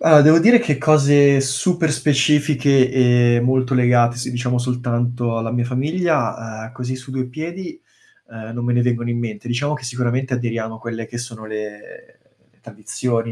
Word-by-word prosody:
Allora, 155 -2 +7
devo 155 +3 +6
dire 235 +7 +6
che 150 - -1
cose 145 -1 +4
super 155 +5 0
specifiche 140 -2 +2
e 120 -2 +3
molto 130 +1 0
legate, 120 -1 +3
se 125 - -4
diciamo 125 0 -2
soltanto 120 -1 -2
alla 115 0 -3
mia 120 - 0
famiglia, 125 -5 -2
uhm, 115 - -14
così 130 0 -5
su 130 +1 -12
2 130 -1 -3
piedi, 175 - -7 0.5
uhm, 110 0 -10
non 120 0 -4
me 120 - 0
ne 120 - +2
vengono 120 -1 -1
in 120 - -2
mente. 115 -1 -6
Diciamo 140 +5 -2
che 150 - -7
sicuramente 125 +1 -2
aderiamo 115 -2 -3
a - - -13
quelle 115 -1 -6
che 120 - -9
sono 115 -2 -8
le 105 -1 -10 0.4
tradizioni, 115 -2 -4
125 Hz, 170 wpm, -19 LUFS, 120-140 Hz, 0.5 s, Allora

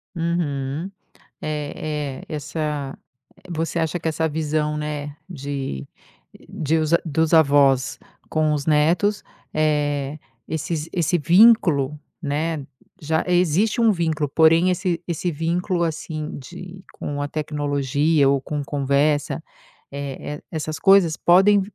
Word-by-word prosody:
Uhum. 165 -1 -2 0.5
É, 150 -2 -4
é, - - -6
essa 150 -2 -3 0.4
eh, - - -24
você 165 0 -2
acha 165 +1 -1
que 165 - -4
essa 160 0 0
visão, 150 0 -1
né, 150 -1 -4
de 140 - -5 0.6
de 160 +1 0
os 155 0 0
dos 160 +1 0
avós 140 -4 +4 0.3
com 155 -1 +1
os 145 -1 -2
netos, 165 +7 +2 0.3
eh, 145 -2 0 0.3
esses 160 0 -3
esse 175 -1 +1
vínculo 165 - +4 0.2
né, 150 0 -2 0.4
já 160 +1 0
existe 180 +6 +2
um 225 -1 +5
vínculo, 160 -5 -1
porém, 165 +4 +5
esse 180 -2 -1
esse 175 +1 -2
vínculo, 170 +3 -1
assim, 155 -1 -4
de 180 +7 -10
com 145 0 -4
a 145 - -1
tecnologia 145 0 +1
ou 140 0 +3
com 145 +1 -4
conversa, 145 +1 0 0.5
eh 140 +1 -5
eh, - - -24
essas 155 -1 -4
coisas 195 -5 +5
podem 195 +3 +5
155 Hz, 125 wpm, -22 LUFS, 145-170 Hz, 0.6 s, um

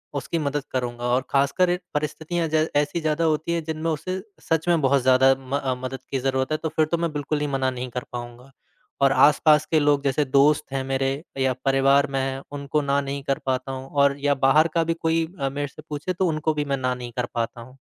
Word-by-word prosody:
उसकी 165 +4 -2
मदद 145 -1 -2
करूँगा 120 -2 -3
और 130 - +3
ख़ासकर 140 +6 +2
इ 180 - +1 0.2
परिस्थितियाँ 160 +3 -2
ज 155 0 +3
ऐसी 150 +4 +1
ज़्यादा 155 +1 0
होती 160 +1 0
है 170 - 0
जिनमें 160 +1 -3
उसे 185 +5 -3 0.2
सच 160 +1 -1
में 170 -3 +3
बहुत 135 0 +3
ज़्यादा 130 +1 +5
म 135 +1 -3
अ, 130 -2 -1
मदद 130 0 -4
की 135 - 0
ज़रूरत 130 +1 -1
है 155 - +1
तो 160 - 0
फिर 155 - +3
तो 170 - +2
मैं 165 -1 -1
बिल्कुल 145 +1 -2
ही 150 - 0
मना 135 -2 0
नहीं 125 0 -5
कर 125 +1 -4
पाऊँगा। 120 +2 -8 0.5
और 135 -1 +5
आसपास 150 +2 +5
के 160 - +4
लोग 145 -1 +2
जैसे 140 +2 +1
दोस्त 140 +3 +3
हैं 135 -1 -1
मेरे, 135 +2 -1 0.2
या 130 -1 +2
परिवार 135 +1 +4
में 135 - 0
हैं, 135 0 -3
उनको 145 +1 -1
ना 140 0 +1
नहीं 140 0 -5
कर 135 -1 -1
पाता 130 0 -1
हूँ 130 0 -7
और 140 -1 +3
या 145 0 +3
बाहर 155 +4 +5
का 165 - +3
भी 165 +1 0
कोई 165 0 0
अ, 135 -1 0
मेरे 145 +1 -3
से 150 +3 -13
पूछे 150 +5 -3
तो 180 +1 0
उनको 155 0 0
भी 150 -1 -2
मैं 140 -1 -1
ना 130 -1 0
नहीं 125 -1 -7
कर 125 - 0
पाता 115 0 -2
हूँ। 130 +3 -14
140 Hz, 240 wpm, -24 LUFS, 135-155 Hz, 0.5 s, ज़्यादा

